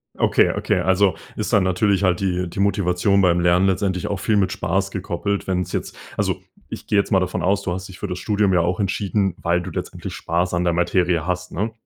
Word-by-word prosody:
Okay, - - +3
okay. - - 0
Also, 95 +1 +3 0.2
ist 110 +2 -3
dann 105 -3 +5
natürlich 95 +2 +1
halt 90 -2 +2
die 90 -2 -1
die 85 - -7
Motivation 100 0 +2
beim 90 -2 +3
Lernen 90 +2 +3
letztendlich 95 -1 0
auch 100 - -2
viel 110 - +1
mit 95 -2 +2
Spaß 95 0 -1
gekoppelt. 95 +2 -3
Wenn's 90 -2 -1
jetzt - - -3 0.2
also, - - -1 0.3
ich - - -8
gehe 105 - +2
jetzt 100 - +1
mal 95 - +5
davon 90 0 -2
aus. 100 +2 +2
Du 95 - -3
hast 90 +1 -5
dich 95 - -12
für 105 - -3
das 90 -1 -4
Studium 105 0 +1
ja 90 - +4
auch 90 +2 -1
entschieden, 100 -1 0
weil 85 0 +1
du - - -6
letztendlich - - -6
spaß 90 +2 -1
an 90 0 +1
der 85 -1 +1
Materie 85 -1 +1
hast, 90 0 -3
ne? 105 +5 -2
95 Hz, 230 wpm, -21 LUFS, 90-100 Hz, 0.3 s, dann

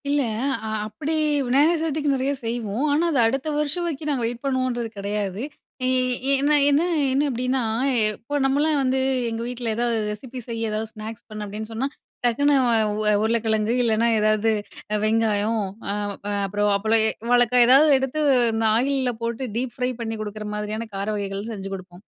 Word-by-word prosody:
இல்ல. 290 0 +2 0.5
அ - - -3 0.2
அப்டி 280 +9 -3 0.3
விநாயகர் 295 +7 +3
சதுர்த்திக்கு 300 -3 0
நிறைய 265 +1 0
செய்வோம். 230 +2 -2
ஆனா 315 +4 +2
அத 290 - 0
அடுத்த 270 +5 -2
வருஷம் 300 +4 -1
வரைக்கும் 305 -2 -3
நாங்க 265 -5 0
வெயிட் 235 +1 -4
பண்ணுவோம்ன்றது 255 -3 -1
கிடையாது. 200 0 -3 0.4
ஈ - - +2 0.5
என்ன 295 +1 +4
என்ன 285 +2 +3 0.3
என்ன 275 +2 +2
அப்படின்னா 255 +1 -1 0.5
இப்போ 235 +8 -6
நம்மளா 285 +4 +2
வந்து 265 0 +1 0.3
எங்க 225 0 -4
வீட்ல 245 -2 -2
ஏதாவது 235 0 0
ரெசிபி 250 +4 -7
செய்ய 230 -1 -2
ஏதாவது 215 +1 -3
ஸ்நாக்ஸ் 220 +1 -8
பண்ண 215 -1 -6
அப்படின்னு 215 +2 -6
சொன்னா, 250 +5 -1 0.4
டக்குனு 285 +5 +3 0.2
அ - - +4 0.2
உ - - -3 0.2
உருளைக்கிழங்கு 220 -1 +1
இல்லைனா 230 0 +2
எதாவது 215 +1 +2 0.5
வெங்காயம், 220 0 +1 0.3
அ - - -1 0.5
அப்புறம் 205 +2 0
அ - - +3
அப்பளம், 220 +2 +3 0.3
வாழக்கா 245 0 +4
ஏதாவது 275 +5 +7
எடுத்து 265 +3 -2 0.3
இந்த 225 0 0
ஆயில்ல 260 +1 +1
போட்டு 235 +2 -3
டீப் 245 0 -3
ஃப்ரை 250 0 0
பண்ணி 225 -1 -3
கொடுக்குற 210 0 -6
மாரியான 210 +2 -3
கார 195 +1 -3
வகைகள் 200 +1 -4
செஞ்சு 195 -2 -6
கொடுப்போம். 185 0 -12
230 Hz, 160 wpm, -23 LUFS, 215-265 Hz, 0.5 s, ஏதாவது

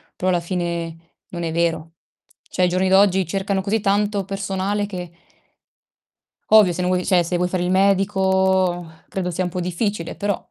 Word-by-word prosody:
Però, 185 - -1
alla 175 -1 +2
fine 170 -1 -3 0.3
non 175 -1 -5
è 165 - -2
vero. 165 -1 -1 0.6
Cioè, - - -3
ai 180 - +4
giorni 185 +1 +1
d'oggi 190 -1 +4
cercano 195 +2 -1
così 205 +4 0
tanto 205 0 +1
personale 195 +1 -2
che 180 -4 -7 1.4
Ovvio, 210 -5 +6
se 175 - -3
non 180 0 0
vuoi 180 0 0
cioè, 180 -2 +3
se 175 +1 -1
vuoi 180 +1 +1
fare 180 0 -2
il 180 - 0
medico 190 -2 +2 0.2
credo 180 -2 -3
sia 185 +2 -2
un - - -2
po' 180 +1 -4
difficile, 180 0 -3
però 200 -2 -2
185 Hz, 175 wpm, -21 LUFS, 175-195 Hz, 1.4 s, Ovvio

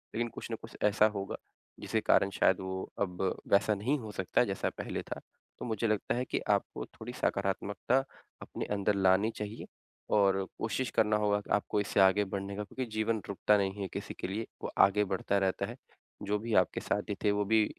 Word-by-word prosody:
लेकिन 120 +1 0
कुछ 115 - -8
न 115 - 0
कुछ 115 - -11
ऐसा 105 +1 +5
होगा 100 -1 -3 0.4
जिसके - - 0
कारण 95 - +4
शायद 95 - +3
वो 95 0 -4
अब 90 -2 -1 0.3
वैसा 100 +1 +4
नहीं 125 +9 0
हो 110 -3 -7
सकता 95 -2 +1
जैसा - - -1
पहले - - -3
था। - - -6 0.4
तो - - -5
मुझे 115 -1 0
लगता 110 +1 0
है 125 +1 -1
कि - - -1
आपको - - 0
थोड़ी - - -9
सकारात्मकता 100 +5 0 0.4
अपने - - -5
अंदर 100 0 +1
लानी 95 +3 +4
चाहिए 105 +1 -5 0.5
और 95 -2 +4 0.2
कोशिश 115 +2 -1
करना 105 0 +4
होगा 105 -1 +2
कि - - -18
आपको 105 0 +1
इससे 100 - 0
आगे 95 +2 +6
बढ़ने 100 +1 -4
का 105 - -3
क्योंकि 130 +6 -4
जीवन 110 0 0
रुकता 105 +1 +3
नहीं 100 0 -1
है 95 - -1
किसी - - -5
के - - -2
लिए, 105 +4 -3 0.2
वो - - -3
आगे 105 +1 +2
बढ़ता 95 +1 0
रहता 95 -1 +1
है। - - -7 0.5
जो 105 +1 0
भी 115 +1 -4 0.3
साथी 105 0 -1
थे 105 - +4
वो 105 0 +1
भी 110 +1 +4
105 Hz, 200 wpm, -31 LUFS, 95-110 Hz, 0.5 s, आगे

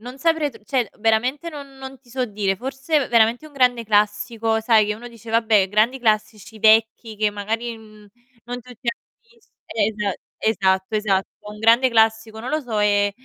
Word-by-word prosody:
non 250 +4 -10
saprei 325 -1 +1
tr 225 -4 -16
cioè 250 -4 0
veramente 245 +9 0
non 280 -3 -10
non 265 0 -9
ti 255 - -26
so 255 +1 -1
dire, 200 -4 -2
forse 270 - -1
veramente 235 +5 +3
un 305 - -16
grande 250 -4 +2
classico, 215 +2 +1
sai, 220 -1 +4
che 210 - -1
uno 240 +3 -10
dice: 230 -1 -12
"Vabbè 220 -4 +3
grandi 220 +6 +2
classici 215 -2 -1
vecchi 220 +1 +3
che 210 0 +1
magari, 225 +3 -4
mhmm, 215 -1 -16 0.4
non 245 +1 -6
tutti 245 0 -10
hanno 235 - -3 0.3
vist", 465 -1 -28 0.2
esa 210 -2 -1 0.3
esatto, 190 -2 +1
esatto, 195 -3 0 0.2
un 210 - -10
grande 230 +4 +4
classico, 220 -1 +1
non 240 - -6
lo 310 - 0
so, 235 -6 -4
ehm, 205 -1 +2
225 Hz, 180 wpm, -21 LUFS, 210-250 Hz, 0.4 s, sai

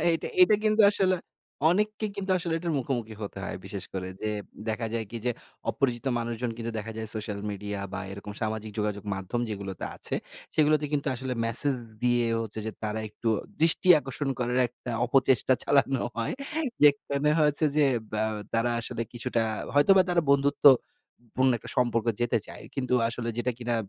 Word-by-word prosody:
এইটা 165 - -1
এইটা 360 - +7
কিন্তু 215 0 +3
আসলে 190 -2 +2 0.6
অনেককে 210 +3 0
কিন্তু 195 -1 -3
আসলে 170 -1 -2
এটার 170 0 -2
মুখোমুখি 120 -4 -3
হতে 100 -1 -6
হয়। - - -4
বিশেষ 95 -1 -6
করে 95 -1 -4
যে 110 - -1 0.4
দেখা 110 +1 -1
যায় 115 -1 -1
কি 120 - -5
যে, 125 - +2 0.4
অপরিচিত 125 -1 -1
মানুষজন 120 +1 -2
কিন্তু 115 0 -4
দেখা 110 +1 -5
যায় 110 -1 -3
সোশ্যাল 105 -2 -4
মিডিয়া 105 0 -4
বা 100 - -3
এরকম 100 +1 -7
সামাজিক 110 0 -2
যোগাযোগ 105 -1 -2
মাধ্যম 95 +5 -3
যেগুলোতে 100 -3 -5
আছে, - - -4 0.4
সেগুলোতে 150 -1 +3
কিন্তু 145 0 0
আসলে 130 +1 -4
মেসেজ 125 +5 +3 0.3
দিয়ে 120 -1 +3
হচ্ছে 110 -1 -5
যে - - -1
তারা 105 +1 -2
একটু 105 +2 -4 0.3
দৃষ্টি 165 +3 +3
আকর্ষণ 135 +1 -4
করার 125 0 0
একটা 120 +1 -9 0.2
অপচেষ্টা 130 0 +3
চালানো 135 -2 +3
হয়। 115 -1 -1 0.5
যেখানে 145 0 +4
হয়েছে 150 0 +3
যে 150 - +5 0.3
ব্য - - -2 0.4
তারা 115 +1 +2
আসলে 115 0 -3
কিছুটা 120 -1 -1 0.3
হয়তোবা 185 +7 +6
তারা 175 -1 +3
বন্ধুত্ব 140 +1 +3 0.7
পূর্ণ 130 0 +4
একটা - - -6
সম্পর্ক 120 -2 +1
যেতে 120 0 +2
চায়। - - -10
কিন্তু 130 -2 0
আসলে 115 0 -4
যেটা 120 +1 0
কিনা 120 -1 -1
120 Hz, 170 wpm, -27 LUFS, 110-145 Hz, 0.7 s, এইটা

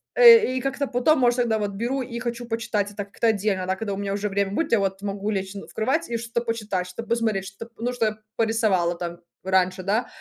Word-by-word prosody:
э, 465 - +8
и - - -1
как-то 275 +1 -1
потом, 265 +5 +3
может, 245 -1 +3
тогда 230 -2 +2
вот 205 -1 -2
беру 240 +7 -2
и 235 -1 -6
хочу 240 0 -4
почитать 220 -3 -1
это 205 0 -5
как-то 200 +3 -1
отдельно, 200 -3 +1
да, 190 - +1
когда 205 0 -4
у - - -4
меня 200 0 -2
уже 205 +1 -2
время 200 0 0
будет, 300 +9 -1
я 230 - +5
вот 195 0 -1
могу 200 0 -3
лечь 195 -1 -3
на 200 - -8
в - - -16
кровать 265 +9 0
и 235 - -1
что-то 235 +1 -3
почитать, 210 -5 -2
что-то 230 +6 -8
посмотреть, 220 -5 0
что 195 +4 -8
п 230 - -20
что-то, 230 - -11
ну, 245 - 0
что 240 -2 0
я 215 0 -1 0.2
порисовала 215 -7 +2
там 170 0 -5 0.3
раньше, 185 0 +1
да. 215 +5 0
220 Hz, 255 wpm, -24 LUFS, 195-235 Hz, 0.3 s, э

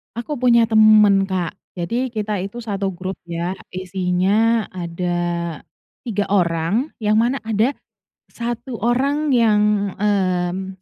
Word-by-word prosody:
Aku 250 +5 -4
punya 235 -2 +4
temen, 215 -3 +6
Kak, 185 0 -3 0.2
jadi 210 +9 -2
kita 210 -1 -2
itu 200 +6 -5
1 200 -3 -3
grup 185 +2 -5
ya 170 +2 -3 0.2
isinya 190 +4 +1
ada 175 0 -3 0.9
3 205 -3 -2
orang, 185 - 0
yang 215 0 +2
mana 240 +4 +1
ada 225 +4 +1 0.6
satu 240 +2 -4
orang 275 +6 +1
yang, 210 -5 +2
mmm, 190 -2 -1
205 Hz, 115 wpm, -20 LUFS, 185-230 Hz, 0.9 s, temen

